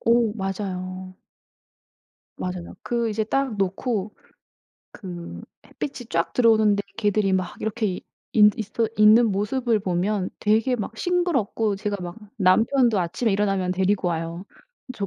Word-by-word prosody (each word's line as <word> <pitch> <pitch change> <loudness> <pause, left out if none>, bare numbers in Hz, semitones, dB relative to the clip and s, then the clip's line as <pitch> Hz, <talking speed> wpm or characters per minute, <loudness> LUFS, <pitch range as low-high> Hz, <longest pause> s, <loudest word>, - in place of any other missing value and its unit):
오. 230 -2 +3
맞아요. 185 -2 -4 1.2
맞아요. 180 -1 -5
그 235 -2 -1
이제 215 +1 -1
딱 265 0 -1
놓고 200 +2 -2 0.8
그 175 -3 -8 0.3
햇빛이 250 -4 -6
쫙 165 0 0
들어오는데 220 -4 +4
걔들이 210 -2 +1
막 185 -1 -1
이렇게 220 +1 -1
있 185 -2 -3 0.5
있어 220 +1 -1
있는 215 +3 +7
모습을 220 +3 0
보면 190 +1 -1
되게 225 +5 +2
막 220 0 -5
싱그럽고 270 - 0
제가 205 0 -2
막 175 0 -6 0.2
남편도 225 +4 +3
아침에 185 +7 0
일어나면 195 -2 0
데리고 190 0 +1
와요. 165 +2 -4 0.5
저 200 -4 -3
205 Hz, 265 characters per minute, -24 LUFS, 185-225 Hz, 1.2 s, 있는